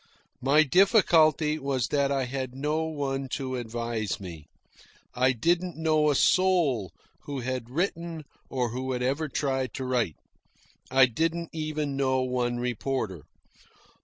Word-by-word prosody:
My 145 Hz, +4 st, +5 dB
difficulty 160 Hz, -, +4 dB
was 135 Hz, -4 st, -1 dB
that 140 Hz, -1 st, +1 dB
I 135 Hz, -2 st, 0 dB
had 130 Hz, 0 st, -4 dB
no 150 Hz, +4 st, -1 dB
one 135 Hz, -4 st, -3 dB
to 130 Hz, -2 st, -3 dB
advise 115 Hz, -3 st, -3 dB
me. 85 Hz, -6 st, -9 dB, 0.7 s
I 130 Hz, +1 st, +3 dB
didn't 170 Hz, +8 st, 0 dB
know 155 Hz, -1 st, +2 dB
a 145 Hz, -, +2 dB
soul 155 Hz, -, +3 dB, 0.3 s
who 140 Hz, -2 st, -4 dB
had 125 Hz, -1 st, -4 dB
written 170 Hz, +1 st, -3 dB, 0.2 s
or 125 Hz, -3 st, -1 dB
who 130 Hz, +2 st, -3 dB
had 125 Hz, 0 st, -2 dB
ever 140 Hz, +4 st, -1 dB
tried 130 Hz, -3 st, -1 dB
to 130 Hz, -, -4 dB
write. 120 Hz, -, 0 dB, 0.7 s
I 130 Hz, 0 st, +6 dB
didn't 165 Hz, +7 st, -1 dB
even 155 Hz, -3 st, -3 dB
know 130 Hz, -1 st, +1 dB
one 125 Hz, -1 st, -1 dB
reporter. 120 Hz, -, -3 dB
135 Hz, 135 wpm, -27 LUFS, 125-155 Hz, 0.7 s, I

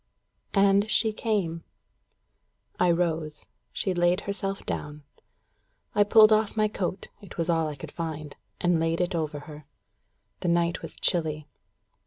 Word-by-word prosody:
And 200 Hz, +1 st, +4 dB
she 220 Hz, 0 st, +2 dB
came. 190 Hz, -8 st, -1 dB, 1.2 s
I 180 Hz, -, +4 dB
rose. 165 Hz, -3 st, -1 dB, 0.3 s
She 190 Hz, -, -1 dB
laid 175 Hz, +2 st, +2 dB
herself 195 Hz, 0 st, -4 dB
down. 150 Hz, 0 st, -5 dB, 0.9 s
I 205 Hz, -, +5 dB
pulled 215 Hz, +1 st, +7 dB
off 215 Hz, 0 st, +2 dB
my 215 Hz, 0 st, +4 dB
coat 190 Hz, -2 st, -4 dB
it 200 Hz, -, -12 dB
was 170 Hz, 0 st, +1 dB
all 165 Hz, -1 st, +1 dB
I 150 Hz, -, -5 dB
could 135 Hz, -, -9 dB
find 155 Hz, -3 st, -5 dB, 0.2 s
and 175 Hz, -2 st, +2 dB
laid 165 Hz, 0 st, 0 dB
it 180 Hz, +1 st, 0 dB
over 155 Hz, -3 st, -2 dB
her. 150 Hz, -1 st, -11 dB, 0.7 s
The -, -, -3 dB
night 170 Hz, 0 st, +1 dB
was 165 Hz, -, -6 dB
chilly. 155 Hz, -4 st, -1 dB
175 Hz, 145 wpm, -27 LUFS, 160-200 Hz, 1.2 s, pulled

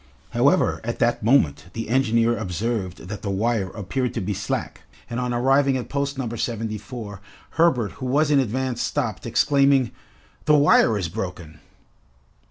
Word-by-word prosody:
However, -, -, +2 dB
at -, -, -3 dB
that -, -, +1 dB
moment 85 Hz, -, +2 dB
the 115 Hz, 0 st, -4 dB
engineer 115 Hz, -1 st, +2 dB
observed 95 Hz, -3 st, -3 dB
that 105 Hz, +1 st, -6 dB
the 100 Hz, -, -4 dB
wire 100 Hz, 0 st, 0 dB
appeared 120 Hz, +5 st, -3 dB
to -, -, 0 dB
be 100 Hz, +2 st, -2 dB
slack, 95 Hz, +1 st, -4 dB, 0.3 s
and 120 Hz, -, -4 dB
on 125 Hz, -1 st, -1 dB
arriving 135 Hz, +2 st, +3 dB
at 125 Hz, -, -6 dB
post 140 Hz, 0 st, -2 dB
No. 130 Hz, -3 st, -2 dB
74, 110 Hz, -2 st, -5 dB, 0.3 s
Herbert, 145 Hz, -10 st, +2 dB
who 130 Hz, -, -6 dB
was 145 Hz, +4 st, +2 dB
in 145 Hz, -, +5 dB
advance 130 Hz, 0 st, -1 dB
stopped, 120 Hz, -7 st, -2 dB
exclaiming, 140 Hz, -1 st, +3 dB, 0.5 s
"The 150 Hz, -, +5 dB
wire 130 Hz, -6 st, +5 dB
is 95 Hz, -4 st, -2 dB
broken!" 85 Hz, -3 st, -6 dB
115 Hz, 155 wpm, -23 LUFS, 100-135 Hz, 0.5 s, in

